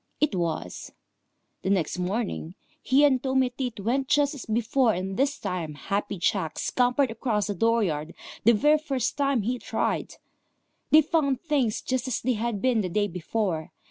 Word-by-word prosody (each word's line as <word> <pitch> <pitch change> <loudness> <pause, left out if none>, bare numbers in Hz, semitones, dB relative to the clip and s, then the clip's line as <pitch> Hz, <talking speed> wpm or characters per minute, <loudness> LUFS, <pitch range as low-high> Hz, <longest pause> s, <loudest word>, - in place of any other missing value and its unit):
It 300 -7 +2
was. 165 - -3 0.7
The - - -2
next 180 -3 0
morning 185 -2 -3 0.3
he 270 +3 +3
and 260 -3 +3
Tommy 265 -2 +1
Tit 250 -5 -4
went 260 +6 0
just 290 0 +3
as 280 - -8
before, 230 +1 +2
and 190 +2 -3
this 275 +4 +1
time 180 -6 -4
Happy 200 +5 -3
Jack 170 -2 0
scampered 250 +1 +1
across 225 -2 -1
the 205 - -2
dooryard 190 -7 0 0.3
the 235 - +6
very 300 +8 +4
first 270 -6 -2
time 275 -5 +1
he 245 +4 -1
tried. - - -2 0.7
They 310 +1 +7
found 280 -4 +1
things 280 -9 0
just 260 0 -1
as 255 - -1
they 255 +1 0
had 225 -2 -2
been 250 -4 +3
the 185 - -2
day 205 +3 +1
before. 180 -2 -3
230 Hz, 170 wpm, -26 LUFS, 195-265 Hz, 0.7 s, They